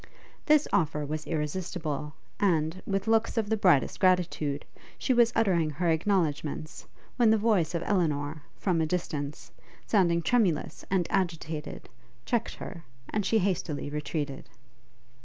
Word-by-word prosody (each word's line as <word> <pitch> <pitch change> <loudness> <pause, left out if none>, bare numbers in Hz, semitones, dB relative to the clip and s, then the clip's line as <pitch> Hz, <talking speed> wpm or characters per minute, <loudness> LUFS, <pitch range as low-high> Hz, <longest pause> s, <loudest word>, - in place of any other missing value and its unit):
This 300 -1 +5
offer 150 -3 +1
was 155 +1 -4
irresistible, 150 -2 -3 0.2
and, 170 -2 +1
with 195 0 -1
looks 225 +1 +2
of 215 -2 0
the - - +4
brightest 180 -9 +3
gratitude, 170 -6 +1 0.3
she 260 - +1
was 235 -1 +5
uttering 180 -8 +2
her 165 +3 0
acknowledgements, 160 -3 -1 0.3
when 240 -3 +5
the 220 - +5
voice 205 -6 +2
of 170 - -1
Elinor, 155 -5 0 0.2
from 175 -4 +1
a 160 - +1
distance, 150 -4 -3 0.3
sounding 170 -5 +2
tremulous 195 -10 +1
and 185 -2 +2
agitated, 165 -5 -2 0.4
checked 235 -2 -1
her, 170 -4 -8 0.3
and 210 -2 -1
she 225 - +3
hastily 180 -7 -1
retreated. 150 -2 -4
170 Hz, 135 wpm, -28 LUFS, 155-200 Hz, 0.4 s, This